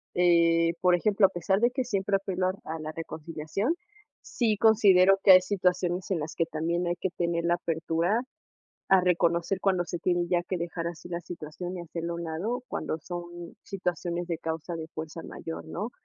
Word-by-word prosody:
eh, 170 -1 +4
por 180 -1 +5
ejemplo, 200 +2 +4
a - - -11
pesar 190 +3 0
de 240 +2 +4
que 260 +1 -2
siempre 200 -4 0
apelo 190 -1 -1
a - - +2
l 190 - -12
a 160 +1 -4
la 155 0 -5
reconciliación, 165 - -3 0.5
sí 220 -4 0
considero 195 -3 +6
que 190 - +9
hay 185 - +8
situaciones 180 -1 0
en 185 -4 0
las 155 +1 -5
que 165 - 0
también 170 +3 -1
hay 175 - 0
que 190 - -1
tener 170 -1 0
la 175 0 +3
apertura 170 +5 0 0.7
a 190 -1 +6
reconocer 175 +1 +1
cuando 185 -2 +2
se 175 - -4
tiene 175 0 +1
ya 175 -1 +2
que 185 - -1
dejar 170 0 -4
así 170 0 -6
la 170 -1 -3
situación 175 +2 -7
y 175 - -5
hacerlo 170 0 -5
a - - -4
un - - -4
lado 190 +10 -3
cuando 160 - -3
son 175 +1 -8
situaciones 175 -2 -3
de 165 -2 -2
causa 165 +1 -4
de 160 -1 -6
fuerza 160 +1 -6
mayor, 165 - -7
¿no? 210 +8 -4
175 Hz, 200 wpm, -28 LUFS, 165-190 Hz, 0.7 s, que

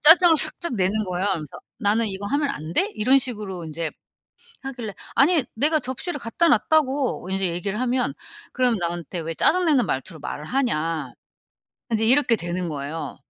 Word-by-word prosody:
짜증을 345 -3 +4
살짝 340 -2 -1
내는 205 +2 +1
거예요. 180 +1 -2
그러면서 160 -8 -2 0.2
"나는 220 +2 +2
이거 195 0 -5
하면 285 +2 0
안 155 - -5
돼?" 400 +4 +2
이런 255 +6 +4
식으로 210 -9 -4
인제 160 0 -4 0.7
하길래 245 -6 -6 0.2
"아니 305 0 +5
내가 305 +6 +3
접시를 265 +5 -4
갖다 335 +10 +1
놨다고." 275 - +1
인제 190 -2 +1
얘기를 195 +6 -3
하면 250 0 0 0.4
그럼 250 -3 +2
나한테 170 0 -3
"왜 165 0 -4
짜증 360 +1 +3
내는 275 -8 +4
말투로 155 +5 -3
말을 150 +1 -6
하냐." 165 - -1 0.8
인제 220 0 +1
이렇게 245 -1 +4
되는 175 -1 -3
거예요. 150 +2 -5
215 Hz, 350 characters per minute, -23 LUFS, 175-270 Hz, 0.8 s, 아니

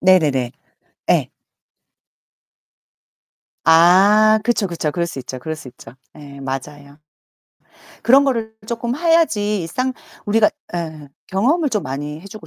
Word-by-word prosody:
네네네. 150 -10 +3 0.6
예. - - +2 2.3
아 195 +7 +6
그쵸, 230 -3 +1
그쵸. 165 -4 -3
그럴 170 +3 -2
수 165 - -7
있죠 130 0 -7
그럴 160 +5 -5
수 145 - -11
있죠. 120 -1 -14 0.2
예 140 -2 -12
맞아요. 140 +2 -7 1.0
그런 270 +4 +6
거를 230 -5 -1
조금 235 +1 -3
해야지 295 - +2
일상 255 +11 -2 0.3
우리가 210 +1 +3 0.2
예. 160 -4 -5 0.2
경험을 280 - +1
좀 210 -4 -1
많이 145 +3 -5
해 190 - -13
주고 215 +1 -11
180 Hz, 225 characters per minute, -19 LUFS, 150-220 Hz, 2.3 s, 아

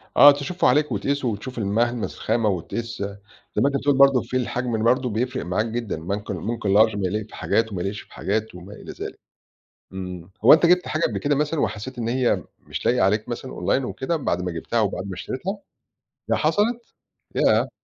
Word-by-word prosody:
آه، 145 - +10
تشوفُه 145 +5 0
عليك 145 +2 +3
وتقيسه 135 +6 -1
وتشوف 120 +3 -4
الملمس 115 +3 0
الخامة 110 -1 +1
وتقيس 110 +5 -4 0.5
زي 105 - +2
ما 135 - +4
أنت 140 - 0
بتقول 140 +1 +2
برضه 135 -2 +6
في 125 +2 -2
الحجم 125 -1 -2
ال 110 - -1
برضه 125 +2 +2
بيفرق 125 +4 -2
معاك 90 +5 0
جدًا، 115 -1 -3
بنكن 100 +2 -3
ممكن 110 -3 -2
لارج 110 +1 +5
بيليق 100 +2 -2
في - - -13
حاجات 110 -1 0
وما 90 - -3
يليقش 100 +3 -3
في - - -19
حاجات 110 0 -2
وما 90 +3 -10
إلى - - -9
ذلك. - - -7 0.7
إمم. 90 -2 -7
هو - - +9
أنت 160 +2 +7
جِبت 180 +1 +3
حاجة 155 - -1
قبل - - +1
كده 145 0 +1
مثلًا 150 +1 0
وحسيت 125 +5 -3
إن 115 -1 -2
هي 125 0 +1
مش - - -6
لايقة 125 +1 +3
عليك 105 +4 +1
مثلًا 125 +2 -5
أونلاين 135 - 0
وكده، 130 +6 -2
بعد 90 - -1
ما 90 - -2
جبتها 85 +8 -2
أو 105 -3 +3
بعد - - -5
ما 95 - -5
اشتريتها؟ 175 - -4 0.7
ياه - - +3
حصلت؟ 230 +3 0 0.4
ياه! - - +3
115 Hz, 200 wpm, -23 LUFS, 105-135 Hz, 0.7 s, آه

